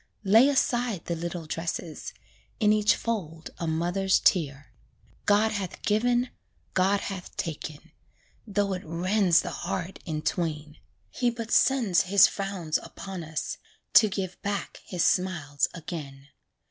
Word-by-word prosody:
Lay 220 +7 +6
aside 245 - 0
the 170 - -2
little 170 0 -5
dresses 165 0 -4 0.5
In 210 -2 +4
each 210 0 +4
fold 165 -9 -4
a 170 - -2
mother's 175 +4 +1
tear. 145 -6 +1 0.5
God 210 +2 +4
hath 195 -5 -4
given 240 +4 +2 0.4
God 195 +2 +2
hath 190 -2 -6
taken, 155 -2 -5 0.6
Though 200 -1 0
it 180 - -4
rends 180 +2 +2
the - - -4
heart 185 +1 -4
in 155 -2 -4
twain, 155 -3 -2 0.3
He 245 - +1
but 230 -1 -6
sends 230 -11 +4
his 195 +2 +6
frowns 190 -6 -1
upon 190 -3 -8
us, 160 -1 -4 0.3
To 215 - +7
give 190 -2 -4
back 200 0 -3
his 180 -2 -1
smiles 160 -7 +1
again. 150 -5 -8
185 Hz, 135 wpm, -27 LUFS, 165-205 Hz, 0.6 s, To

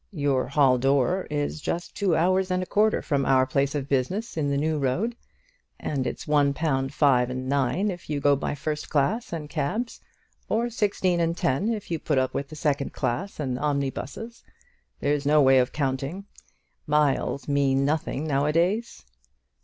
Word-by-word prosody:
Your 140 -5 0
hall 135 -2 +3
door 135 +7 +1
is 145 0 -2
just 170 +4 -3
two 190 -5 +1
hours 185 +3 +2
and 185 0 0
a - - -5
quarter 215 +3 +2
from 140 -2 0
our 130 -1 +4
place 140 +2 0
of 140 -2 -2
business 160 - -1
in 150 -3 0
the 140 - 0
New 155 +1 0
Road; 175 - 0 0.6
and 135 -3 -2
it's - - -5
one 145 -2 +3
pound 135 -3 0
five 130 -4 +3
and 130 0 -4
nine 140 +9 +1
if 175 -3 -9
you 150 -2 -1
go 145 0 +4
by 140 +1 -3
first 150 +1 -4
class 150 - 0
and 160 -3 -4
cabs, 175 - -3 0.5
or 235 +2 0
sixteen 195 -5 +1
and 170 0 0
ten 135 - +1
if 210 -5 -5
you 165 - -1
put 150 -2 -1
up 130 0 +1
with 140 +2 -4
second 145 -2 -1
class 180 +12 -3
and 130 -4 -2
omnibuses. 145 - -3 0.6
There's 145 0 +1
no 150 - +4
other 145 - +6
way 135 0 +6
of 125 0 +1
counting. 140 +6 -2 0.6
Miles 145 -1 +1
mean 140 -1 +2
nothing 150 0 -1
now 145 -1 +1
a - - +2
days." 180 - 0
145 Hz, 180 wpm, -25 LUFS, 135-175 Hz, 0.6 s, other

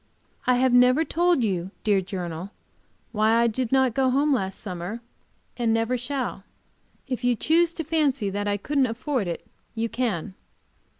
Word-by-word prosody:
I 250 - +5
have 255 0 +2
never 250 +5 +5
told 345 -5 +2
you, 185 -4 -1
dear 205 -3 +3
journal, 180 -2 -5 0.6
why 220 0 +2
I 235 +1 +4
did 235 +1 -1
not 265 -3 +3
go 265 +1 +2
home 280 +3 +2
last 190 -6 -2
summer, 185 +2 -5 0.6
and 235 -2 +1
never 225 +2 +1
shall. 250 -4 -3 0.6
If 255 -2 -4
you 245 0 +3
choose 330 +8 +3
to 325 - -3
fancy 280 -9 0
that 205 +1 -2
I 205 0 +1
couldn't 275 +5 +1
afford 245 - -2
it 170 - -5 0.3
you 230 0 -1
can! 210 -7 -2
240 Hz, 165 wpm, -25 LUFS, 205-265 Hz, 0.6 s, I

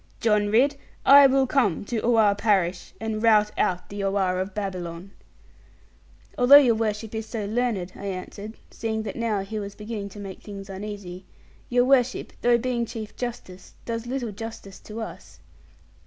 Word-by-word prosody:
John 210 -2 +2
Ridd, 270 +7 +3 0.3
I 280 0 +9
will 270 0 +3
come 245 - +1
to 230 +1 -2
Oare 225 -3 +4
parish, 195 -4 0
and 220 -1 -3
rout 210 -2 +4
out 180 -1 0
the 200 0 -5
Oare 195 -2 +1
of 190 +1 -4
Babylon.' 185 -2 -5 1.3
'Although 250 +3 +8
your 270 -5 +8
worship 220 0 -2
is 220 0 -4
so 220 -3 -4
learned,' 215 -4 -1
I - - -8
answered 200 +3 -7
seeing 220 -1 -3
that 205 - -5
now 225 -4 -1
he 215 +3 -5
was 200 -1 -6
beginning 210 -2 -6
to 205 - -11
make 195 -2 -8
things 195 -2 -9
uneasy; 195 -2 -7 0.4
'your 245 0 +3
worship, 255 -1 +2
though 240 0 +4
being 240 0 -1
Chief 220 -2 -7
Justice, 230 -7 -7
does 230 0 -4
little 245 -3 -3
justice 205 -2 -8
to 220 +1 -8
us. 220 - -9
215 Hz, 165 wpm, -25 LUFS, 195-235 Hz, 1.3 s, I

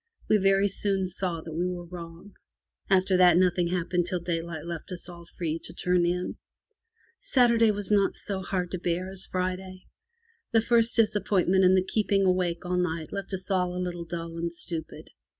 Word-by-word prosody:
We 215 - +5
very 195 0 +3
soon 195 -1 0
saw 180 -2 -3
that 160 0 -8
we 175 +3 0
were 175 -1 -5
wrong. 170 +2 -10 0.6
After 190 0 +3
that 180 -2 +6
nothing 180 -1 +3
hap 175 -1 -2
pened 175 -1 +1
till 180 - -1
daylight 165 -2 -4
left 170 +1 -6
us 180 -1 -6
all 170 -1 -11
free 165 -2 -2
to - - -7
turn 180 -1 +2
in. 180 +1 -2 0.8
Saturday 235 -3 +4
was 205 -1 -2
not 200 -2 +3
so 195 -2 -4
hard 180 -1 -2
to 185 - -3
bear 180 +2 -2
as 190 -1 -2
Friday. 185 0 -3 0.7
The 225 - +5
first 230 0 +2
disap 210 -3 +2
pointment 190 -1 +3
and 185 +1 +6
the 185 - +3
keeping 200 -1 +1
awake 180 -2 0
all 180 0 -1
night 165 -3 -2
left 195 -1 -5
us 185 +1 -6
all 180 -1 +1
a - - -3
little 175 -1 -3
dull 165 0 -6
and 170 0 -2
stupid. 165 -1 -6
180 Hz, 190 wpm, -27 LUFS, 170-195 Hz, 0.8 s, that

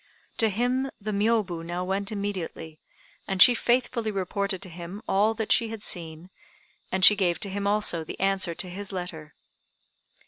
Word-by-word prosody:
To 225 -2 +3
him 250 +6 0
the 215 +1 -4
Miôbu 205 -5 0
now 175 +2 -4
went 195 +3 -2
immediately, 185 -6 -5 0.5
and 195 -1 -2
she 245 - +9
faithfully 240 -1 0
reported 200 -1 -2
to 190 - -7
him 175 +5 -9
all 210 +3 +2
that 220 -1 -3
she 230 -3 +4
had 220 -2 -7
seen, 165 0 -4 0.6
and 185 0 +5
she 210 - +9
gave 180 -4 0
to 200 - -1
him 200 +1 -2
also 205 -5 +1
the - - -8
answer 195 -3 0
to 185 - -4
his 195 +3 -7
letter. 175 -5 -7
195 Hz, 170 wpm, -26 LUFS, 180-215 Hz, 0.6 s, she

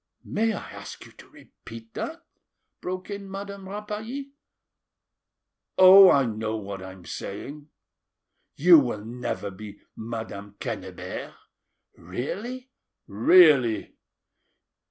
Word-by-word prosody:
'" - - -51
"May 225 +1 0
I 200 - -7
ask - - -10
you - - -15
to - - -16
repeat 115 0 -14
that?" 330 +1 -6 0.6
broke 185 +2 -5
in 200 -1 -6
Madame 195 0 -7
Rapally 215 +7 -6 1.5
"Oh! 190 +1 +10
I 140 -5 +4
know 110 -1 -3
what 100 -2 -7
I 95 0 -8
am 95 -2 -15
saying. 145 - -7 0.9
You 170 +2 +7
will 120 -6 -3
never 115 -3 -4
be 100 +1 -10 0.2
Madame 110 -3 -7
Quennebert." - - -6 0.6
"Really?" 215 - -6 0.3
"Really." 125 - +4
145 Hz, 110 wpm, -25 LUFS, -, 1.5 s, Oh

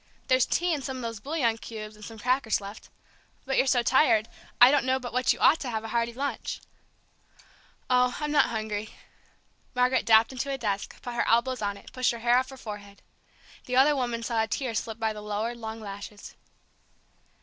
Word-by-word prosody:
"There's 255 -1 +4
tea 350 0 +1
and 290 -3 -3
some 265 -1 -4
of - - -6
those 230 -2 -4
bouillon 245 -4 0
cubes 215 -2 -8
and 210 - -14
some 225 +1 -9
crackers 250 0 +1
left. 200 +1 -10 0.6
But 270 0 -1
you're 270 - +3
so 250 -2 +3
tired, 235 -4 +4 0.3
I 245 +2 +9
don't 285 -4 +3
know 260 +1 +2
but 245 -2 -7
what 255 0 +3
you - - -1
ought 320 - +5
to 260 - -4
have 220 -2 -3
a 225 - -6
hearty 235 +1 0
lunch." 275 +4 -4 1.3
"Oh, 250 0 +2
I'm 300 -1 -2
not 295 - +5
hungry." 215 -2 -4 0.8
Margaret 250 +1 +2
dropped 225 +1 +6
into 260 +1 -4
a 275 - -1
desk, 205 -5 -3
put 245 - -5
her 240 - 0
elbows 240 +2 +2
on 200 -1 -2
it, - - -15
pushed 255 -1 +1
her - - -5
hair 240 +1 +4
off 260 - -4
her 265 - -10
forehead. 205 -4 -9 0.6
The 250 - -2
other 280 +3 +5
woman 240 -3 -2
saw 230 -1 0
a 220 - 0
tear 250 +1 -2
slip 220 0 -3
by 220 -1 -1
the 210 - -8
lowered, 210 +3 -3
long 225 -1 -6
lashes. 205 0 -9
235 Hz, 205 wpm, -27 LUFS, 220-260 Hz, 1.3 s, I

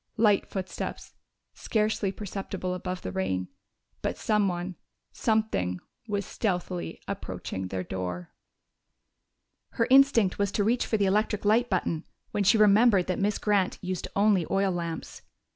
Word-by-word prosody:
Light 210 -3 +3
footsteps, 190 -1 -5 0.4
scarcely 215 -2 0
perceptible 195 -2 -4
above 180 0 -4
the 95 - -4
rain. 95 0 -2 0.5
But - - -2
someone 190 -4 0 0.4
something 215 - 0 0.3
was 200 -2 -1
stealthily 180 -4 -3
approaching 95 - -5
their 95 0 -3
door! 90 -1 -5 1.4
Her 230 - +2
instinct 260 -9 +5
was 200 -1 +1
to 205 - +1
reach 235 +4 +1
for 220 - +1
the 200 - +2
electric 210 +1 +1
light 230 +4 +3
button 170 -4 -1 0.2
when 205 - 0
she 210 +4 +5
remembered 210 -2 +5
that 185 - -2
Miss 205 +1 +1
Grant 200 -3 +1
used 185 -1 -3
only 200 -3 +4
oil 195 0 +2
lamps. 170 -2 -5
195 Hz, 135 wpm, -28 LUFS, 175-210 Hz, 1.4 s, instinct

